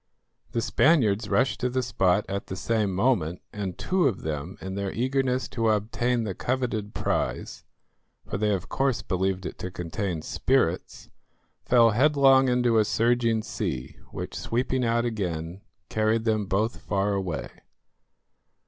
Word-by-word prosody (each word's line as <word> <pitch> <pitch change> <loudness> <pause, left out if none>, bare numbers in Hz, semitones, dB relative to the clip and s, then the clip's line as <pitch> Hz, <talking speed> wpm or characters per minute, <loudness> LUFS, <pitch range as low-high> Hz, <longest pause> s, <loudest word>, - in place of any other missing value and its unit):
The 115 -2 0
Spaniards 110 -11 +3
rushed 100 +6 +2
to 125 - 0
the 130 +1 -1
spot 95 -4 +2
at 100 +1 -4
the 95 - -5
same 105 +1 0
moment, 90 -5 +1
and 95 -4 -4
two 185 -4 +2
of 110 -8 -2
them, 80 +3 -4
in 95 0 -6
their 100 0 -2
eagerness 130 +1 0
to 115 -2 0
obtain 115 +3 0
the 100 -4 -3
coveted 115 -2 -2
prize, - - -2 0.6
for 95 - -3
they 105 0 +2
of 95 -3 -2
course 135 -2 0
believed 95 0 -1
it - - -6
to 90 - -4
contain 90 -1 -4
spirits, - - 0 0.5
fell 115 -2 +5
headlong 135 +1 +5
into 120 -2 +3
a - - +5
surging 115 0 +1
sea, 65 -10 -4
which, - - -6
sweeping 125 +2 -1
out 115 0 +1
again, 90 -5 -3 0.3
carried 110 +1 +1
them 110 -3 +1
both 105 +5 0
far 100 +1 0
away. 95 -6 -2
110 Hz, 150 wpm, -26 LUFS, 95-125 Hz, 0.6 s, fell